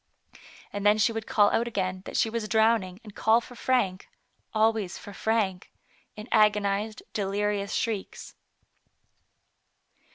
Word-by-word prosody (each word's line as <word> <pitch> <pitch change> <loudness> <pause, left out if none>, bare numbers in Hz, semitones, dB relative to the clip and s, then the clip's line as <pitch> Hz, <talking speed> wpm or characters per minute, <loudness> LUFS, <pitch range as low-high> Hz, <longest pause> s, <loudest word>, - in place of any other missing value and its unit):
And 205 0 -4
then 210 +1 +5
she 215 +1 +3
would 225 -1 -5
call 205 -1 +4
out 235 - +1
again 185 -4 -2
that - - -4
she - - +3
was 225 -1 -3
drowning, 220 -4 +2
and 210 -2 -12
call 220 +3 +3
for 240 - -12
Frank, 230 -8 0 0.4
always 220 -3 +1
for 205 - -10
Frank, 200 -4 -1 0.4
in 215 +2 -9
agonized, 210 -1 +2
delirious 200 0 -1
shrieks. 220 -4 -3
210 Hz, 130 wpm, -27 LUFS, 200-225 Hz, 0.4 s, then